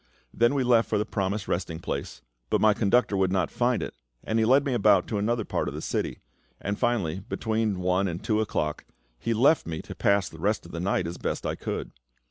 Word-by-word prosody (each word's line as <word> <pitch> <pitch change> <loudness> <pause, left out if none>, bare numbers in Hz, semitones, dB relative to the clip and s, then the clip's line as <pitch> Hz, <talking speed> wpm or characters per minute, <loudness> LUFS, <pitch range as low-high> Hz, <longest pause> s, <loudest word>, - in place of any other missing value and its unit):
Then 120 +4 +3
we 135 - +2
left 120 -2 +3
for 105 - +1
the 105 - 0
promised 100 -1 -2
resting 85 -2 -2
place; 85 - -5 0.3
but - - +2
my 110 -1 +5
conductor 105 +1 +2
would 95 -1 +2
not 95 -1 0
find 120 0 +1
it, - - -5 0.3
and 110 +1 0
he 110 - +3
led 135 +5 +4
me 135 - 0
about 105 -6 +4
to 105 - -1
another 115 +1 0
part - - -1
of - - -4
the - - -4
city; - - -2 0.4
and 100 +1 -3
finally, 100 -8 0
between 110 -1 -1
one 90 +2 +2
and 85 -1 -4
two 110 -1 +1
o'clock, 75 -8 -2 0.4
he 115 0 -1
left 140 - +4
me 80 -1 -3
to - - -8
pass 100 -2 +2
the 80 - -11
rest 105 +3 0
of 85 - -11
the 85 - -5
night 95 0 0
as 85 +1 -5
best - - -3
I - - 0
could. - - -4
105 Hz, 230 wpm, -27 LUFS, 95-115 Hz, 0.4 s, my